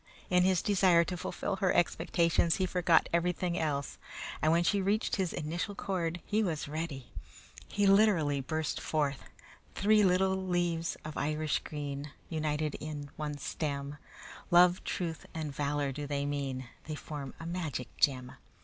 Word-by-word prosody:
In 180 0 +5
his 185 -1 +3
desire 185 -4 +5
to 180 - -4
fulfill 180 - -3
her 190 -2 +2
expectations 170 -1 +2
he 190 - +1
forgot 175 -2 +3
everything 175 0 +1
else, 145 -5 -2 0.4
and 155 - +4
when 170 +1 +4
she 200 +3 +2
reached 205 +4 +1
his 185 -3 0
initial 170 +6 -3
chord 175 -4 -2
he 215 +1 +1
was 165 -9 -1
ready. 150 -3 -5 0.6
He 205 - +1
literally 195 -9 +4
burst 155 +3 -2
forth: 145 -3 -1 0.5
"Three 210 +1 +4
little 190 0 +3
leaves 175 -3 -1
of 155 - -6
Irish 155 +1 0
green, 145 -1 -5 0.2
United 155 -1 -1
on 145 -2 -6
one 150 -1 -4
stem, 140 -1 -3 0.5
Love, 180 0 +6
truth, 165 -3 -3
and 155 -3 -3
valor 145 0 -1
do 145 +2 -5
they 140 0 -1
mean, 135 -3 -3 0.2
They 155 - -4
form 145 -3 -7
a 165 - -7
magic 160 -7 -4
gem." 130 -2 +2
160 Hz, 150 wpm, -31 LUFS, 145-180 Hz, 0.6 s, Love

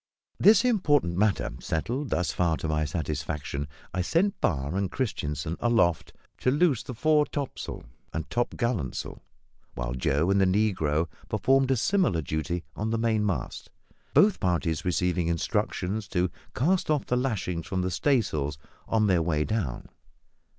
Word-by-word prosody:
This 220 +3 +6
important 145 - +2
matter 100 +1 +1
settled 120 - -2
thus 90 - 0
far 85 -3 +1
to - - -4
my 75 0 0
satisfaction, 75 -2 -3 0.3
I 90 - 0
sent 185 - +1
Barr 70 +3 0
and 95 -2 -1
Christianssen 80 - -2
aloft 110 -9 +2 0.3
to - - +2
loose 145 -3 +3
the 125 - -7
fore 150 +3 +3
topsail 140 -3 -5 0.3
and 80 0 -4
topgallantsail, 120 - -2 0.5
while - - -3
Joe 70 +7 +1
and 100 0 +3
the - - +5
negro 90 -6 +1 0.2
performed 135 0 +3
a 135 - +3
similar 120 - +2
duty 80 +4 -2
on 110 +1 -2
the 115 - 0
mainmast, 105 - -1 0.5
both 205 -1 +5
parties 85 -3 0
receiving 90 0 0
instructions 90 +4 -1
to 90 -1 0 0.2
cast 175 +7 +1
off 150 -2 +1
the 125 - 0
lashings 105 -10 -2
from 95 -2 -1
the 90 - -1
staysails 85 - 0 0.3
on 110 -1 +2
their 90 -4 +3
way 80 -2 +1
down. 100 - -2
95 Hz, 145 wpm, -27 LUFS, 80-125 Hz, 0.5 s, This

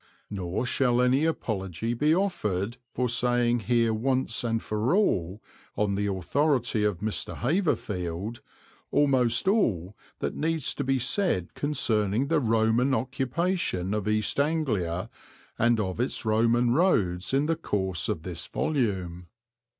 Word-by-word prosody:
Nor 95 +3 -2
shall 125 -1 +1
any 130 +4 +3
apology 110 - -2
be 150 +7 +2
offered 120 - -1
for 125 0 -1
saying 120 0 +2
here 115 -2 +3
once 130 +1 0
and 115 -1 0
for 110 - 0
all, 95 - 0 0.3
on 105 -1 +1
the 100 +1 -1
authority 120 - 0
of 105 -4 0
Mr. 110 0 -3
Haverfield, 110 - -2 0.5
almost 130 -2 +2
all 105 - +1 0.2
that - - -3
needs 160 -2 0
to 140 - -3
be 135 0 +1
said 130 - 0
concerning 115 -4 0
the 165 -1 +3
Roman 115 +2 +2
occupation 130 - -1
of 105 -1 -2
East 110 +4 0
Anglia 110 - 0 0.5
and 115 0 +3
of 95 -1 -2
its 125 -1 -2
Roman 115 +2 +3
roads 100 - +1
in 135 +2 +2
the 165 +1 +1
course 95 - -1
of 80 - -2
this 85 -2 -5
volume. 95 - -2
115 Hz, 135 wpm, -27 LUFS, 100-135 Hz, 0.5 s, any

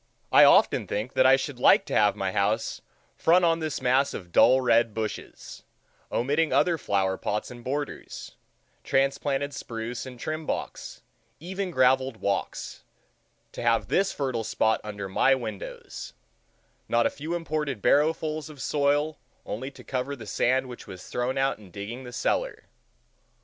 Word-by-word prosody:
I - - +8
often - - +4
think 110 +6 -3
that 130 - +5
I 135 - +7
should 135 -1 -4
like - - +5
to - - -6
have 105 -1 +4
my 95 -1 -2
house 105 +4 0 0.3
front 175 +2 +4
on 165 0 +2
this 155 -2 -3
mass 130 +3 +2
of 90 -3 -8
dull 130 +8 +6
red 115 -3 +2
bushes, 110 -1 -6 0.5
omitting 145 +6 +1
other 170 -3 +2
flower 95 -4 0
plots 105 +3 -3
and 120 -1 -11
borders, 145 +3 -5 0.5
transplanted 140 +1 0
spruce 120 -1 -5
and 125 -2 -10
trim 155 +3 -4
box, - - -5 0.4
even 190 +3 -4
graveled 130 -4 +2
walks—to 100 -2 -6
have 115 -1 +1
this 195 +1 +2
fertile 130 -5 -2
spot 110 0 +1
under 105 -2 -6
my 135 +8 +3
windows, 110 -6 -7 0.8
not 120 0 +3
a - - +2
few 160 +4 -4
imported 150 -6 -2
barrow 150 +9 +4
fuls 155 -1 -5
of 150 -2 -12
soil 145 +2 0 0.3
only 130 +6 -4
to 140 - -14
cover 130 +2 -3
the 115 -4 -10
sand 130 +5 +1
which 125 -2 -10
was 95 -2 -10
thrown 125 +2 -2
out 135 -2 +1
in 100 -3 -14
digging 105 +8 -7
the 125 - -8
cellar. - - -1
130 Hz, 155 wpm, -26 LUFS, 110-145 Hz, 0.8 s, I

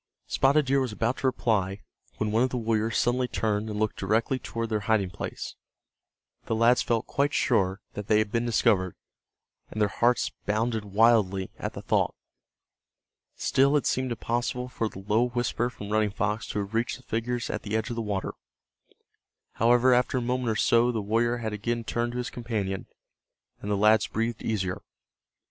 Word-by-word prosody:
Spotted 140 +2 +3
Deer 135 +1 +2
was 130 -3 -1
about 115 +5 -1
to 135 - 0
reply 105 -6 0 0.4
when 110 -1 -1
one 110 +2 +2
of 130 - +3
the 125 - -3
warriors 110 -1 0
suddenly 125 +1 +1
turned 110 -2 -1
and 105 - -4
looked 110 0 -1
directly 110 +6 +1
toward 115 -2 -4
their 110 -1 0
hiding 100 -5 +2
place. - - -6 0.9
The 115 - 0
lads 115 +2 +4
felt 115 -2 0
quite 140 +1 0
sure 95 -6 +1
that 105 -1 -6
they 105 - +4
had 110 -1 +1
been 115 +1 +1
discovered, 110 -6 +2 0.7
and 110 - -6
their 105 -1 +3
hearts 120 +5 +1 0.2
bounded 110 +1 0
wildly 100 -2 +3
at - - -4
the - - -8
thought. - - +1 1.2
Still 140 +2 +3
it 145 - -1
seemed 130 -1 0
impossible 120 +2 -2
for 115 -3 -2
the 95 - -10
low 115 +4 +3
whisper 120 0 -1
from 105 -4 -9
Running 110 -1 +2
Fox 105 +2 -2
to - - -4
have 100 +1 -3
reached 115 +2 0
the 130 - -19
figures 120 +1 -2
at - - -3
the 110 0 -1
edge 110 +3 -3
of - - -3
the 115 - -2
water. 100 -3 -3 1.2
However, 120 +3 +5
after 125 +1 +2
a - - 0
moment 125 0 -1
or 110 - 0
so 120 +3 +3
the 115 - -2
warrior 115 +4 +1
had 110 -2 -4
again 115 +3 -2
turned 120 +1 -2
to - - -4
his 125 0 -3
companion, 105 -6 -3 0.7
and 105 - -5
the 100 - +1
lads 105 +1 +4
breathed 115 +1 -2
easier. 95 -5 -2
115 Hz, 185 wpm, -27 LUFS, 105-120 Hz, 1.2 s, However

